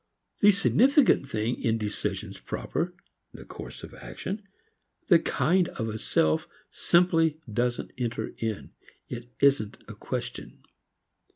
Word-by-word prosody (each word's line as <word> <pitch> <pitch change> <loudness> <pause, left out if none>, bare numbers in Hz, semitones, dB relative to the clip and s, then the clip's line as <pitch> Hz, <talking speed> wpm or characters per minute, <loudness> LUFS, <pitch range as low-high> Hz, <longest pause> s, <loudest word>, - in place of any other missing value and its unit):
The 205 - +7
significant 240 - +4
thing 110 -1 -1
in 115 -1 +1
decisions 105 -2 -3
proper, 180 +2 -3 0.4
the - - -11
course - - -9
of - - -9
action, 200 +3 -6 0.7
the 170 -3 +8
kind 170 +5 +2
of 115 -8 -4
a 110 0 -4
self 80 -5 +1 0.2
simply, 165 -3 +3
doesn't 120 +2 -1
enter 120 -2 -2
in; 110 -2 -3 0.4
it 120 0 -7
isn't 135 -7 +3
in - - -8
question. - - -6
135 Hz, 120 wpm, -27 LUFS, 115-180 Hz, 0.7 s, the